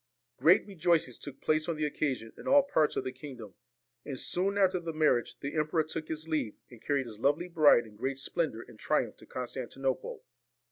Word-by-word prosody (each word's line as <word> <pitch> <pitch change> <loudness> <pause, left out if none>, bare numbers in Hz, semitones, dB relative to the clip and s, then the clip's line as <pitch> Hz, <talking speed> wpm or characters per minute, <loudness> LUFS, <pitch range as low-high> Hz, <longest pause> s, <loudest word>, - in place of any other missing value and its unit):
Great 160 +8 +5
rejoicings 170 - +1
took 140 -2 -9
place 155 +2 +1
on 165 - 0
the 155 0 -1
occasion 135 -6 -2
in - - -11
all 280 +1 +6
parts 160 - +1
of - - -1
the 130 - -3
kingdom; 130 -6 -10 0.5
and 135 -3 -4
soon 195 +3 +1
after 190 -2 +3
the 165 -1 -5
marriage 150 -6 +2
the 140 0 -4
emperor 155 +1 +1
took 155 0 -5
his 160 0 -4
leave, 155 -9 -1
and 120 -2 -14
carried 140 -2 0
his 110 -3 -10
lovely 145 +7 +1
bride 155 -8 +5
in 105 -1 -15
great 130 +4 -2
splendour 135 -4 -2
and - - -15
triumph - - 0
to - - -16
Constantinople. 130 +1 -4
150 Hz, 195 wpm, -30 LUFS, 130-165 Hz, 0.5 s, all